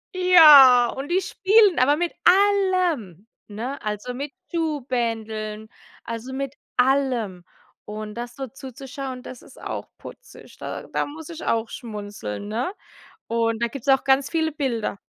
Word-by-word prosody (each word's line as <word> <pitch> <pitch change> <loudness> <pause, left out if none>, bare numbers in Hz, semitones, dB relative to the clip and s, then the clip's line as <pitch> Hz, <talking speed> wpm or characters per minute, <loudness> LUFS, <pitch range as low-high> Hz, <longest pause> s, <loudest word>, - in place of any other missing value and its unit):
Ja, 300 -9 +8
und 270 +2 -6
die 365 +2 +2
spielen, 405 -1 +3
aber 285 +4 +4
mit 345 +1 -2
allem, 365 - +2 0.2
ne, 235 +7 -6
also 210 +4 -4
mit 275 +3 -5 0.2
Schuhbändeln, 230 -9 -3 0.4
also 230 +3 -6
mit 275 +1 -4 0.2
allem. 250 -8 +1 0.4
Und 210 0 -7
das 240 0 -7
so 270 +1 -5
zuzuschauen, 265 0 -8
das 250 - -10
ist - - -17
auch - - -5
putzig. - - -14
Da - - -6
da - - -1
muss 310 +2 -10
ich 335 -1 -8
auch 225 0 0
schmunzeln, 205 - -7
ne? 240 - -3 0.5
Und 230 0 -1
da - - +3
gibt's 275 +2 -9
auch 270 -1 +4
ganz 270 0 +3
viele 320 -1 0
Bilder. 240 -9 -2
260 Hz, 145 wpm, -23 LUFS, 225-300 Hz, 0.5 s, Ja